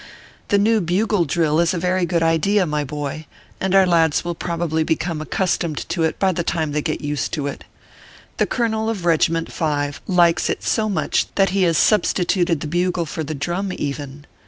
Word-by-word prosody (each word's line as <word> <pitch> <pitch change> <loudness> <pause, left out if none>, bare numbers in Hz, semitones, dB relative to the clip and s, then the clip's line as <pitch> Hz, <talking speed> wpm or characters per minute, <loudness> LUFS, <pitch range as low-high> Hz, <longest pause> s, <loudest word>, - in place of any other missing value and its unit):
The 205 - +3
new 215 +2 +3
bugle 185 +2 +1
drill 155 0 +1
is 170 +1 +2
a - - -1
very 180 +1 0
good 170 -1 +1
idea, 170 +5 +2
my 150 -2 -1
boy, 145 +1 -5 0.3
and 190 0 0
our 195 -1 +6
lads 165 -3 +2
will 175 - -2
probably 170 -2 -2
become 160 0 -2
accustomed 170 -2 -1
to 170 - -2
it 160 -1 0
by 190 -1 +2
the 175 - -2
time 160 -2 -1
they 150 +1 -1
get 155 0 -3
used 145 -1 -3
to 150 -4 -2
it. 145 - -5 0.7
The - - +1
colonel 220 -2 -1
of 210 -6 -3
Keg 165 -2 +3
iment 165 0 -2
Five 145 -2 -2
likes 175 -3 +3
it - - -2
so 215 -1 0
much 200 - 0
that 195 -2 +3
he 195 0 +1
has 165 - +1
substituted 180 -5 +2
the - - -4
bugle 175 +1 0
for 160 +1 -4
the 155 +1 -4
drum, 175 +7 -2
even. 145 0 -5
170 Hz, 200 wpm, -21 LUFS, 155-185 Hz, 0.7 s, our